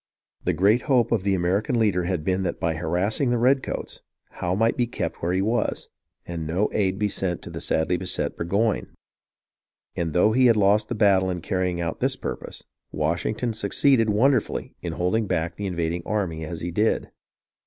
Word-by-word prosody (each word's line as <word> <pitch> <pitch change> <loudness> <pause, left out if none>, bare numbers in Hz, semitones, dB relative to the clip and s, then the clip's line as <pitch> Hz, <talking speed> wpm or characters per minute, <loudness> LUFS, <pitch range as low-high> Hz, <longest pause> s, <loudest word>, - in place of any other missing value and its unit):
The - - +2
great 105 +6 +3
hope 125 -4 +3
of 115 -4 +2
the 100 0 +1
American 95 +8 0
leader 100 -6 +2
had 90 -3 -1
been 95 +3 0
that 90 -2 -2
by 80 0 0
harassing 90 - 0
the 120 - +2
redcoats, 130 +3 0 0.3
Howe 90 +1 -2
might 115 +3 +2
be 120 - 0
kept - - -4
where 85 - 0
he 95 +1 +1
was, 115 +4 -1 0.4
and 85 -2 -5
no 90 +6 0
aid 95 -2 +1
be 105 0 +1
sent 95 -3 -2
the - - -7
sadly 80 +3 +1
beset 90 0 -1
Burgoyne; 100 +5 -1 1.0
and 85 -2 -2
though 90 +5 +4
he 130 +2 +4
had 115 - +5
lost 105 +1 +3
the 120 - -2
battle 100 -3 +3
in 90 -1 -2
carrying 90 -1 -1
out 85 -1 -3
this - - +1
purpose, - - -6 0.3
Washington 85 +10 -1
succeeded 115 +3 +2
wonderfully 120 +3 +1
in 85 - -4
holding 100 +6 0
back 85 0 -1
the 100 - -4
invading 85 -1 -2
army 85 -7 -2
as 80 +1 -6
he 85 - -3
did. 105 +6 0
95 Hz, 185 wpm, -24 LUFS, 85-110 Hz, 1.0 s, had